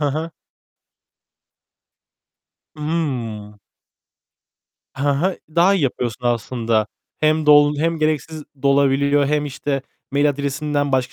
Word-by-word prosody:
he 145 -1 +1
he. 155 +4 -3 2.5
Hıı. 125 -10 -3 1.4
Hı 145 +1 +1
hı. 170 +7 0 0.2
Daha 180 +4 +5
iyi 190 - 0
yapıyorsun 125 -2 -2
aslında. 115 -2 0 0.3
Hem 155 0 +2
dol 145 0 +6
hem 165 +2 0
gereksiz 155 0 -2 0.2
dolabiliyor 140 +1 +3
hem, 150 +1 0
işte, 140 0 -3 0.3
mail 145 +1 +3
adresinden 145 0 -2
başka 130 -1 0
145 Hz, 105 wpm, -20 LUFS, 130-150 Hz, 2.5 s, dol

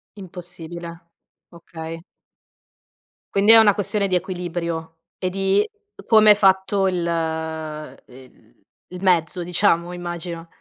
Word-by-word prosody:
Impossibile, 175 -3 -8 0.5
okay. 165 -1 -9 1.3
Quindi, 200 +2 +4
è 225 - +10
una 215 -3 +6
questione 205 0 0
di 185 - 0
equilibrio, 170 -3 -4 0.2
e 185 - -2
di 195 +2 +1 0.4
come 215 -2 +6
è - - +7
fatto 195 0 +2
il 180 -2 -1
el 155 - -6 0.4
il 180 - -8
mezzo, 180 -1 +1
diciamo, 175 -1 +1
immagino. 175 -1 -6
175 Hz, 110 wpm, -21 LUFS, 165-195 Hz, 1.3 s, è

